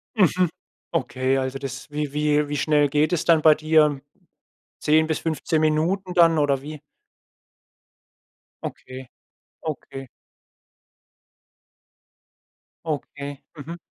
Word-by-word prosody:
Mhm, 185 -3 +3 0.4
okay, 130 +1 0
also, 130 +1 -2
das 130 0 -7
wie 150 -1 -3
wie 150 0 +1
wie 145 0 -3
schnell 150 -2 +2
geht 150 +3 +1
es 170 -1 0
dann 165 -2 +5
bei 155 -1 +7
dir? 155 -2 +3 0.8
10 155 +1 +3
bis 160 - -2
15 160 0 -1
Minuten 170 +5 0
dann 165 -2 +5
oder 140 -2 +2
wie? 150 +1 -8 1.8
Okay, 130 -1 -8 0.6
okay. 135 -3 -6 2.8
Okay, 145 -2 -5
mhm. 160 +4 -7
150 Hz, 105 wpm, -23 LUFS, 140-160 Hz, 2.8 s, bei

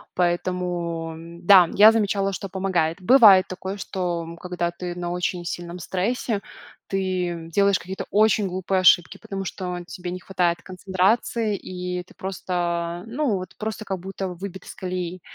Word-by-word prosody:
поэтому, 175 -2 -1 0.3
да, 180 -2 +7
я 215 +2 +8
замечала, 200 -3 +1
что 195 - -5
помогает. 185 -3 -1
Бывает 205 -4 +7
такое, 190 +1 -5
что, 175 -3 -3
м, 165 +1 -9
когда 175 -1 -2
ты 175 0 -6
на 175 -1 -4
очень 180 0 -2
сильном 175 +1 -5
стрессе, 200 +4 -1 0.5
ты 180 -3 -2
делаешь 200 0 +3
какие-то 190 +2 -6
очень 215 0 +3
глупые 185 +1 -1
ошибки, 175 -2 +5
потому 195 -1 -5
что, 180 -1 -4
э, 175 - -6
тебе 180 -1 -7
не 185 - -5
хватает 175 -3 0
концентрации, 195 +4 0
и 180 -1 -5
ты - - -19
просто, 175 -2 -3
ну 245 -2 0
вот, 185 -1 -7
просто 220 -2 -4
как 190 -3 -4
будто 190 +1 -5
выбит 185 +1 -7
из - - -10
колеи. 180 -1 -4
185 Hz, 155 wpm, -24 LUFS, 175-195 Hz, 0.5 s, я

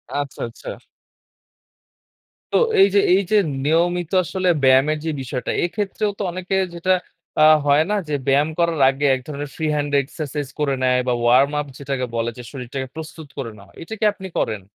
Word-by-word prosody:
আচ্ছা, 145 -1 -4
আচ্ছা। 115 - -9 1.8
তো - - +5 0.2
এইযে 200 +1 +5
এইযে 195 +2 +2 0.3
নিয়মিত 170 +2 +1
আসলে 185 +1 -2 0.2
ব্যায়ামের 135 +4 +4
যে - - 0
বিষয়টা 130 -1 -3
এক্ষেত্রেও 205 +3 -1
তো - - -1
অনেকে 185 +2 -3 0.2
যেটা 175 +2 -1 0.5
আ - - +7 0.2
হয় 145 +2 +4
না 210 - +1
যে, - - -2
ব্যায়াম 140 +3 +3
করার 170 -2 +1
আগে 135 +2 -1
এক 130 - -6
ধরনের 145 -1 -5
ফ্রি 160 - -3
হ্যান্ড 145 -1 -1
এক্সারসাইজ 145 0 -5
করে 145 -2 +1
নেয় 125 0 +3
বা 125 - +2
ওয়ার্ম 125 +4 +4
আপ 145 - -8
যেটাকে 135 -2 -3
বলে 115 0 0
যে 125 - -8
শরীরটাকে 130 0 -5
প্রস্তুত 160 -1 -8
করে 125 -5 -4
নেওয়া। 100 0 -16
এটা 165 - -7
কি - - +1
আপনি 190 -2 -8
করেন? 110 -3 -1
145 Hz, 170 wpm, -21 LUFS, 135-175 Hz, 1.8 s, আ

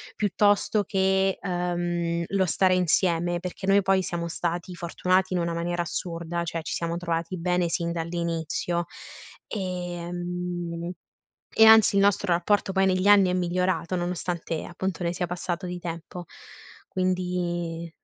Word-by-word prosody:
piuttosto 205 +1 +2
che, 190 -1 +1
ehm, 175 -2 -1
lo 195 -1 +1
stare 185 +2 +3
insieme, 175 -1 +1
perché 180 +1 -6
noi, 195 +1 +5
poi, 190 0 +2
siamo 170 -1 -3
stati 175 +1 -3
fortunati 185 +2 0
in 180 - +1
una 170 0 -1
maniera 175 +1 -1
assurda, 170 0 -3
cioè, 165 0 -3
ci 160 - -5
siamo 170 0 -2
trovati 170 0 -2
bene 180 0 +1
sin 170 0 -1
dall'inizio 170 0 -2 0.6
e 180 -4 -4
mhmm, 175 -1 -4 0.7
e 220 - +9
anzi, 220 -2 +7
il 195 - +5
nostro 200 -2 +2
rapporto 195 +3 +1
poi 190 0 +3
negli 185 +1 +1
anni 200 -3 +6
è - - 0
migliorato, 180 0 0
nonostante, 175 -2 -3
appunto, 180 0 -4
ne 170 0 -1
sia 180 - -1
passato 175 +1 -4
di 180 0 -4
tempo, 175 0 -7 0.6
quindi, 175 -2 -2
175 Hz, 145 wpm, -26 LUFS, 170-185 Hz, 0.7 s, e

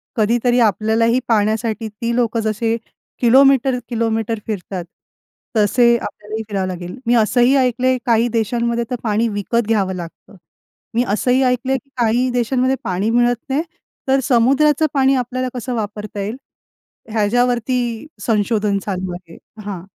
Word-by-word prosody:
कधीतरी 240 +2 +2
आपल्यालाही 225 +2 +2
पाण्यासाठी 220 +1 0
ती 230 +3 -3
लोकं 235 -1 +1
जसे 220 +1 0 0.5
किलोमीटर-किलोमीटर 235 -3 +2
फिरतात, 190 -4 -4 0.7
तसे 235 +3 +4
आपल्यालाही 215 -1 -6
फिरावं 195 -3 -2
लागेल. 180 +2 -6
मी 240 - +4
असंही 240 +4 +3
ऐकलंय, 255 0 +2
काही 235 0 +3
देशांमध्ये 235 +1 0
तर 250 - -1
पाणी 220 +1 +1
विकत 215 +2 -1
घ्यावं 200 -4 +1
लागतं. 175 +3 -10 0.6
मी 235 +2 +2
असंही 250 +6 +1
ऐकलंय 255 +1 +1
की 275 - -16
काही 240 +2 +2
देशांमध्ये 250 +2 +1
पाणी 190 +4 -1
मिळत 240 +1 +3
नाही 275 +3 +1 0.5
तर 270 +1 +3
समुद्राचं 275 +5 +3
पाणी 270 -1 +3
आपल्याला 255 0 -2
कसं 250 0 -4
वापरता 210 -1 -5
येईल 210 +4 -3 0.8
ह्याच्यावरती 240 +2 0 0.2
संशोधन 210 -1 +1
चालू 185 -2 -3
आहे 175 -2 -11 0.3
हां. 195 -4 -5
230 Hz, 130 wpm, -19 LUFS, 210-250 Hz, 0.8 s, तसे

